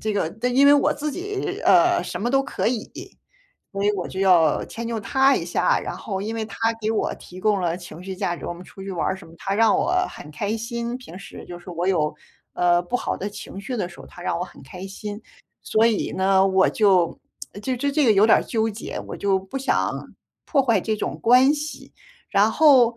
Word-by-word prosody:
这 215 -1 -1
个 200 -5 0 0.2
因 270 +3 +4
为 285 - +8
我 285 - +3
自 300 +1 -3
己， 390 +5 -4
呃， 350 0 +5
什 - - -5
么 240 +4 0
都 270 0 +3
可 270 - -3
以， 235 -3 -2 0.9
所 195 0 -3
以 205 - +4
我 185 -3 -3
就 190 - -5
要 175 -5 +4
迁 230 0 -6
就 230 -1 -3
他 265 +7 +3
一 - - -1
下。 - - +1
然 - - -5
后 195 -3 -4
因 210 +3 -3
为 225 -1 -2
他 220 - -10 0.2
给 215 - -1
我 220 - 0
提 180 +1 -12
供 210 -1 +2
了 170 -1 0
情 175 -2 -10
绪 190 - -5
价 185 -3 -2
值， - - -8
我 - - -3
们 175 - -11
出 195 - -12
去 195 0 -5
玩 170 - -1
儿 190 - -1
什 190 - -13
么， 165 - -15
他 195 0 -2
让 225 0 +4
我 350 - 0 0.2
很 150 - -11
开 205 +8 -2
心， 235 +1 -4
平 195 -8 -11
时 - - -10
就 175 - -7
是 175 +1 -11
我 175 +2 -2
有， 155 -6 +1 0.4
呃， 175 0 +3
不 175 - -8
好 - - -3
的 200 - -4
情 200 -1 -9
绪 250 +5 -4
的 190 -6 -2
时 175 - -15
候， - - -11
他 175 - -12
让 175 -2 -1
我 180 - -2
很 160 - -15
开 180 +8 -9
心。 205 +2 -7 0.4
所 220 +1 +2
以 225 -3 0
呢， 190 0 +3
我 190 0 +4
就 190 -6 +3 0.4
这 255 +2 -1
这 280 +3 0
这 295 0 +2
个 220 - +6
有 200 +1 +5
点 225 - +6
儿 - - -3
纠 225 -1 0
结， 215 +2 -6
我 - - -5
就 195 -1 +1
不 195 +8 -6
想 270 - -1 0.3
破 275 -4 +3
坏 230 -6 +2
这 220 - -1
种 - - -4
关 250 +4 +6
系。 300 +1 -6 0.4
然 205 +2 +4
后 255 -6 +5
205 Hz, 255 characters per minute, -23 LUFS, 185-245 Hz, 0.9 s, 为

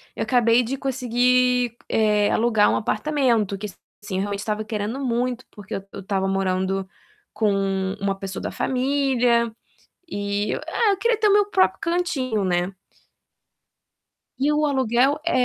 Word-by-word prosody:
eu - - -2
acabei 240 -1 +3
de 260 +3 -3
conseguir, 250 -2 +1
eh, 210 -2 +2
alugar 220 -2 +3
um - - +1
apartamento, 230 -5 0
que 210 - -6
assim, 205 0 -10
eu - - 0
realmente 200 0 -3
estava 215 0 -2
querendo 215 +4 -3
muito, 245 0 -1
porque 205 -2 -10
eu 195 - -5
eu 200 - -8
estava 195 0 -1
morando 190 0 -1 0.5
com 210 -1 +1 0.5
uma 195 0 0
pessoa 195 -1 -6
da - - -4
família 250 -3 +1 0.6
e 205 -3 -2
é, 435 -3 0
eu 390 - 0
queria 465 +1 +1
ter 425 - +3
o 400 - +4
meu 410 -1 +5
próprio 185 0 +3
cantinho, 280 - -1
né. 180 +1 0 1.7
E 280 +2 +1
o 300 - +1
aluguel 260 +1 +2
é 255 -7 +2
230 Hz, 150 wpm, -23 LUFS, 200-260 Hz, 1.7 s, meu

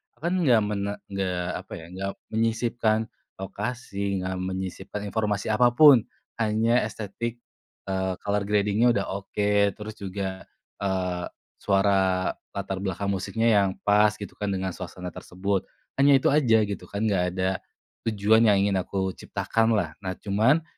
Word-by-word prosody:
aku - - -30
kan - - +1
enggak 125 -9 +4
mene 100 -1 -2 0.2
enggak 90 -2 -2
apa - - -24
ya, 80 - -10
enggak 95 +1 -3 0.2
menyisipkan 115 0 +1 0.4
lokasi, 100 0 -3
enggak 95 0 -3
menyisipkan 95 +2 -4
informasi 105 -1 -1
apa 120 +3 +5
pun. 140 -5 +8 0.4
Hanya 110 +3 +3
estetik, 115 +3 -5 0.5
eee, 95 -1 -1
color 100 0 0
grading-nya 105 +3 +2
udah 100 - 0 0.2
oke, 100 0 +1
terus 105 0 -7
juga, 95 -1 -4 0.4
eee, 90 -2 -1 0.3
suara 95 -2 +2 0.2
latar 95 -1 -3
belakang 100 +1 -2
musiknya 115 +4 +1
yang 100 - +2
pas 105 +1 +4
gitu 100 -1 -8
kan 105 - -2
dengan 95 -1 -1
suasana 90 0 -7
tersebut. 95 +3 -3 0.3
Hanya 140 0 +7
itu 135 - +2
aja 115 -7 +4
gitu 100 -1 -5
kan 100 +2 -3
enggak 100 -5 +2
ada 95 0 +1 0.6
tujuan 110 +2 +4
yang 100 -2 +5
ingin 100 -2 +2
aku 95 +1 -2
ciptakanlah. 110 -4 0
Nah 95 -2 -4
cuman 115 +11 +2
100 Hz, 145 wpm, -26 LUFS, 95-110 Hz, 0.6 s, pun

